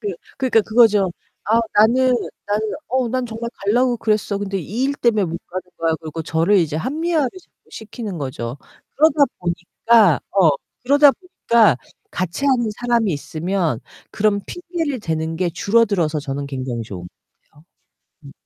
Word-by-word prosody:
그 210 - -3 0.3
그러니까 255 -4 +3
그거죠. 215 -4 +4 0.3
아, 225 +2 +3
나는 250 +4 +4 0.3
나는 210 +1 -1 0.2
'어, 255 -1 0
난 255 +2 -1
정말 230 +1 -5
가려고 245 +4 +2
그랬어. 215 -2 0
근데 200 -1 -3
이 180 +5 -7
일 280 +1 0
때문에 225 -7 +2
못 170 -1 -4
가는 185 +1 -5 0.2
거야.' 165 -1 +1
그러고 160 0 -6
저를 165 +5 +2
이제 155 -4 0
합리화를 305 - 0
자꾸 370 - -27
시키는 215 -4 -7
거죠. 130 -3 -5 0.4
그러다 300 -1 +5
보니까 180 - +2
어, 185 -5 +5 0.3
그러다 285 +3 +6
보니까 235 - +2 0.3
같이 185 +9 -3
하는 250 -4 +2
사람이 235 -3 +1
있으면 160 - -2 0.3
그런 205 -1 +1
핑계를 335 -7 -4
대는 160 -3 -2
게 175 +1 0
줄어들어서 195 -5 +1
저는 140 -1 -4
굉장히 130 -4 -4
좋은 95 -5 -8
것 - - -11 0.4
같아요. 150 - -22 0.6
음. 140 - -11
205 Hz, 330 characters per minute, -20 LUFS, 165-240 Hz, 0.6 s, 그러다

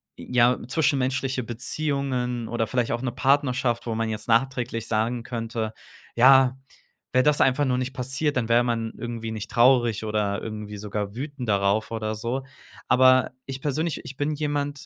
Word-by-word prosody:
ja, 125 0 +2
zwischenmenschliche 130 -3 0
Beziehungen 125 -1 -2
oder 115 -1 -1
vielleicht 125 0 0
auch 120 - -2
'ne 130 -2 -2
Partnerschaft, 130 -2 +1
wo 115 - -2
man 115 0 -1
jetzt 110 +1 -4
nachträglich 120 -1 0
sagen 115 +2 -1
könnte: 115 -2 -4 0.4
„Ja, 130 +1 +6 0.6
wäre 130 - +4
das 150 +1 +3
einfach 135 +2 +3
nur 125 -1 +1
nicht 130 +1 -3
passiert, 135 +3 -1
dann 120 -3 0
wäre 120 +1 +4
man 115 -2 -2
irgendwie 115 -1 -5
nicht 110 -1 -6
traurig 120 -3 +3
oder 105 -2 -1
irgendwie 105 -1 -6
sogar 105 0 -4
wütend 140 -1 -5
darauf 100 +2 +1
oder 110 -1 -3
so.“ 120 +5 -3 0.4
Aber 130 0 +5
ich 135 -1 -6
persönlich, 155 +2 -1
ich 135 - -9
bin 145 +1 0
jemand 145 -1 -3
125 Hz, 160 wpm, -25 LUFS, 115-135 Hz, 0.6 s, Ja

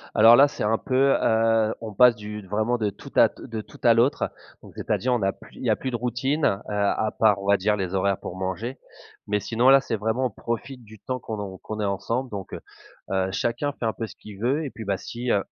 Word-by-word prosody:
Alors 115 +2 +8
là, 140 +3 +7
c'est - - -5
un 110 +2 +2
peu, 135 +1 +2
heu, 115 0 +2
on 110 -2 -6
passe 125 +3 +6
du 105 0 -7
vraiment 110 +5 0
de 110 -3 0
tout 100 - -12
à - - +6
te 110 -2 -7
tout - - -16
à 120 - +7
l'autre, 120 +6 +2 0.3
donc, - - -14
c'est-à-dire 125 +1 -1
on 120 - 0
a 95 0 +2
plus - - -17
il - - -9
y - - +1
a - - +4
plus 130 - -4
de - - -2
routine, 125 +5 -1
heu, 100 +1 +1
à 105 +1 0
part 105 -3 +4
on 100 - -6
va 100 - +5
dire 105 +3 +1
les 95 -2 -3
horaires 95 0 +1
pour 90 - -7
manger, 95 +7 -4 0.5
mais 105 0 +1
sinon 120 +5 +2
là, 135 0 +7
c'est 120 - -2
vraiment 110 +5 -1
on - - -8
profite 120 +2 -5
du 110 -1 -15
temps 130 0 -4
qu'on 110 -2 -6
a 95 -2 -6
qu'on 110 0 -6
est 105 - 0
ensemble 115 +6 -2
donc 100 -3 -7
heu, - - -6 0.5
heu, 95 -1 +1
chacun 120 +8 -1
fait 115 - -5
un 110 - 0
peu 115 - -5
ce - - -13
qu'il 105 -2 -12
veut 135 +8 0
et 135 - -5
puis, 110 - -8
bah 100 -1 0
si, 120 +1 -6
heu, 100 - +2
110 Hz, 260 wpm, -25 LUFS, 100-125 Hz, 0.5 s, Alors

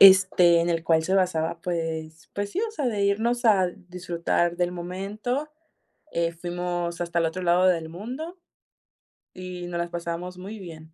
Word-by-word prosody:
este, 185 -3 +8
en 170 +1 +1
el 165 -1 0
cual 160 -1 +3
se 190 +4 0
basaba, 165 -3 +1
pues 160 -2 -4
pues 205 0 -2
sí, 380 - -3
o - - -6
sea, 295 - -2
de 210 -4 0
irnos 235 +5 +1
al 190 -3 +3
disfrutar 175 -1 0
del 175 0 +1
momento. 200 - -3 0.7
Eh, 170 0 +1
fuimos 175 0 -3
hasta 170 0 -1
el - - +2
otro 180 +3 -3
lado 180 +1 +4
del 165 -3 +2
mundo, 255 - -6 1.0
y 180 -1 -6
nos 175 -1 -3
las 170 0 -1
pasamos 175 +1 -4
muy 200 +4 -7
bien. 160 -3 -10
175 Hz, 170 wpm, -26 LUFS, 170-195 Hz, 1.0 s, este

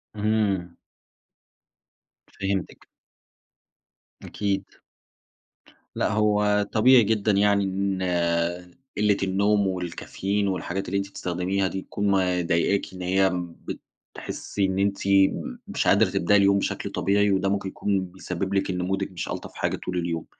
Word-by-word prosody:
اهم. 100 -5 0 1.6
فهمتِك. 95 -1 -3 1.4
أكيد. 100 -2 -2 1.3
لأ، - - 0
هو 105 -1 +2
طبيعي 120 +2 +6
جدًا 105 0 +1
يعني 100 0 +3
إن 95 0 -1 0.9
قلة 105 -1 +3
النوم 100 +1 +2
والكافيين 95 +2 -2
والحاجات 95 0 -3
اللي 100 +2 -1
أنتِ 100 0 -2
بتستخدميها 95 +2 -1
دي 95 +1 -4
تكون 100 - -4
مضايقاكِ 90 0 +1
إن 90 - -8
هي 95 +1 +2
م 90 -1 -4 0.6
بتحسي 100 -1 -3
إن 95 0 -1
أنتِ 100 0 0
م 95 -10 +2
مش - - -1
قادرة - - +5
تبدأي 105 +4 +3
اليوم 100 0 +4
بشكل - - -3
طبيعي، 100 +2 +2
وده 95 0 +1
ممكن 100 -1 -1
يكون 95 -2 -1
بيسبب 95 +1 -5
لِك 95 0 0
إن 90 -1 -2
مودِك 95 +1 -2
مش 90 - -5
ألطف - - -6
حاجة - - -1
طول 90 -1 -5
اليوم. 85 -2 -2
95 Hz, 130 wpm, -25 LUFS, 95-100 Hz, 1.6 s, طبيعي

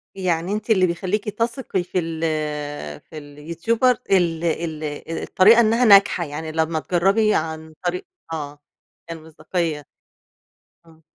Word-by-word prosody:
يعني 180 -1 -1
أنتِ 215 +2 -4
اللي 185 -4 +4
بيخليكِ 190 +5 -2
تثقي 230 -3 -2
في 180 +1 -2
ال 165 -1 -4 0.8
في 155 - -13
اليوتيوبر 165 - 0 0.2
ال 170 -3 +2
ال 160 -2 -2
أ 150 +2 -5
الطريقة 220 +5 +5
إنها 230 +2 +3
ناجحة، 195 -4 +6
يعني 155 +2 -6
لما 160 0 0
تجربي 195 +6 +2
عن 160 0 -3
طريق 175 +1 -2 0.3
آه، 145 -2 -6 0.5
يعني 165 -1 -6
المصداقية، 160 0 -3
آه. 145 - -15 1.0
آه. 160 -1 -21
170 Hz, 135 wpm, -22 LUFS, 160-195 Hz, 1.0 s, ناجحة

